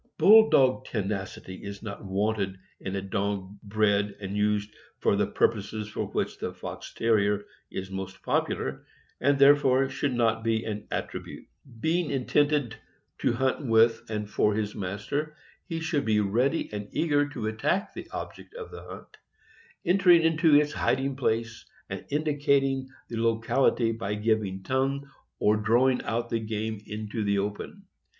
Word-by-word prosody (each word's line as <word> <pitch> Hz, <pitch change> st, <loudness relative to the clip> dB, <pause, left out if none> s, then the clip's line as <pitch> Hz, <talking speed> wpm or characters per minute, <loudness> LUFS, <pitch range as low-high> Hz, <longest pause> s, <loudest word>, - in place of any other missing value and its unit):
Bull 220 Hz, +2 st, +8 dB
dog 130 Hz, -1 st, +4 dB
tenacity 95 Hz, -3 st, -4 dB
is 100 Hz, 0 st, -7 dB
not 105 Hz, 0 st, -7 dB
wanted 100 Hz, 0 st, -1 dB, 0.2 s
in 95 Hz, 0 st, -4 dB
a 95 Hz, -, -3 dB
dog 100 Hz, -1 st, -3 dB
bred 105 Hz, -1 st, +1 dB
and 100 Hz, -1 st, -5 dB
used 105 Hz, 0 st, 0 dB, 0.2 s
for -, -, +2 dB
the -, -, +1 dB
pur -, -, +3 dB
poses 105 Hz, 0 st, -6 dB
for -, -, -3 dB
which -, -, -3 dB
the -, -, -3 dB
Fox -, -, -7 dB
Terrier 105 Hz, -2 st, +2 dB, 0.2 s
is 95 Hz, 0 st, -6 dB
most 95 Hz, 0 st, -6 dB
popular, 65 Hz, 0 st, -1 dB, 0.4 s
and 140 Hz, +2 st, +3 dB
there 140 Hz, +1 st, +8 dB
fore 135 Hz, -1 st, +2 dB
should 135 Hz, -1 st, -1 dB
not 115 Hz, -2 st, +1 dB
be 115 Hz, 0 st, 0 dB
an 105 Hz, -1 st, -5 dB
attribute. -, -, -5 dB, 0.3 s
Being 165 Hz, +5 st, +1 dB
intended, 140 Hz, -2 st, +1 dB, 0.4 s
to -, -, +1 dB
hunt 130 Hz, +4 st, 0 dB
with 115 Hz, -2 st, +4 dB
and 105 Hz, -1 st, -3 dB
for 105 Hz, 0 st, +1 dB
his 105 Hz, -1 st, -2 dB
master, 105 Hz, +11 st, -3 dB, 0.3 s
he 165 Hz, -1 st, -2 dB
should 160 Hz, -3 st, 0 dB
be 110 Hz, -1 st, +3 dB
ready 120 Hz, +10 st, +1 dB
and 105 Hz, 0 st, -5 dB
eager 145 Hz, -3 st, +2 dB
to 120 Hz, -6 st, -5 dB
attack 110 Hz, -, -1 dB
the -, -, -8 dB
object -, -, -8 dB
of 460 Hz, -2 st, -8 dB
the -, -, -9 dB
hunt, -, -, -11 dB, 0.7 s
entering 175 Hz, -2 st, +5 dB
into 160 Hz, -1 st, +4 dB
its 150 Hz, 0 st, +4 dB
hiding 135 Hz, +1 st, 0 dB
place 115 Hz, -3 st, -1 dB, 0.3 s
and -, -, -5 dB
indicating 140 Hz, -3 st, +1 dB, 0.2 s
the 115 Hz, -, -5 dB
locality 115 Hz, +1 st, +2 dB
by 110 Hz, -2 st, -3 dB
giving 105 Hz, -3 st, 0 dB
tongue 135 Hz, +4 st, -1 dB, 0.3 s
or 105 Hz, +1 st, +3 dB
drawing 120 Hz, +5 st, +3 dB
out 115 Hz, +1 st, -2 dB
the 115 Hz, -, +1 dB
game 110 Hz, -1 st, -3 dB
in 105 Hz, 0 st, -5 dB
the 100 Hz, -3 st, 0 dB
open. 105 Hz, -, -4 dB
115 Hz, 155 wpm, -27 LUFS, 105-140 Hz, 0.7 s, Bull